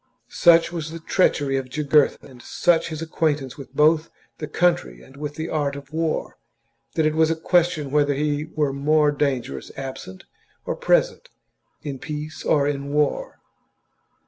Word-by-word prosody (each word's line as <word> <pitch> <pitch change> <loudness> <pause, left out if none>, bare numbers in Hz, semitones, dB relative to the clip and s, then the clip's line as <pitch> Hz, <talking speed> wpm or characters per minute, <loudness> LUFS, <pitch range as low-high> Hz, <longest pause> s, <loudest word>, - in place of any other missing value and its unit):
Such 170 -1 +5
was 165 -3 -4
the 165 +1 -7
treachery 145 -5 +1
of 130 -1 -4
Jugurtha 150 +1 +2
and 125 -3 -14
such 170 +6 +1
his 160 0 -5
acquaintance 150 -5 -1
both 150 +3 +2
with - - -28 0.3
the 150 - -4
country 145 - 0
and 135 - -17
with 145 +1 -6
the 160 +1 -4
art 145 -3 -1
of 140 +1 -11
war, 160 -1 -2 0.6
that 160 - +2
it 155 - +2
was 160 0 +3
a 165 - +1
question 160 -3 +1
whether 145 -1 +2
he 150 +1 -1
were 150 -3 -1
more 150 +2 +3
dangerous 130 - -2
absent 130 -9 -7 0.4
or - - -2
present, - - +1 0.5
in 140 -3 -5
peace 150 +2 -6
or 145 -2 +2
in 140 -1 -3
war. 150 0 -1
150 Hz, 160 wpm, -23 LUFS, 140-160 Hz, 0.6 s, Such